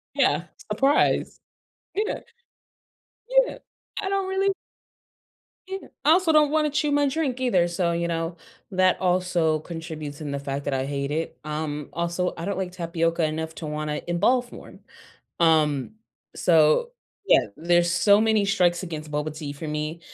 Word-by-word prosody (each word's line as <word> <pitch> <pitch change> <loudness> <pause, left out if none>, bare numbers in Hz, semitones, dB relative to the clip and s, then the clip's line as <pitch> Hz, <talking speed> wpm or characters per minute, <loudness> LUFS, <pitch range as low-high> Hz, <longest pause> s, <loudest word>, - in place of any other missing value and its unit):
Yeah, - - +2 0.3
surprise. 275 +2 +2 0.6
You 420 - +1
know - - -3 1.3
Yeah. - - -7 0.4
I 395 - -3
don't 390 -1 -1
really 390 +1 +1 1.2
you 385 0 -4
know, - - -14 0.2
I 300 - +6
also 345 -1 +4
don't 300 -1 +4
wanna 310 -1 +2
chew 295 0 0
my 290 0 +3
drink 270 -3 -1
either, 190 -9 +2
so, 170 0 0
you 170 0 -1
know, 165 0 -3 0.3
that 185 0 +3
also 180 -4 +1
contributes 160 -3 -7
in 145 -2 -4
the 140 - -2
fact 140 0 -4
that 140 - -1
I 130 0 0
hate 140 0 -3
it. 160 +2 -3
Um, 150 -1 -4
also, 170 +1 -1
I 165 - -5
don't 200 -2 -2
like 185 -2 -3
tapioca 170 -1 -1
enough 160 +1 -2
to 160 - -7
wanna 150 0 -3
involve 245 +9 +2
more. - - -11 0.7
Um, 155 -2 +3 0.4
so, 160 - +4 0.4
yeah, 130 - +5
there's 175 +1 +2
so 200 +4 +5
many 220 -2 +3
strikes 180 -3 +2
against 155 -4 -6
boba 150 +1 -3
tea 150 -2 -5
for 150 +2 -7
me 150 +2 -3
170 Hz, 160 wpm, -25 LUFS, 155-220 Hz, 1.3 s, I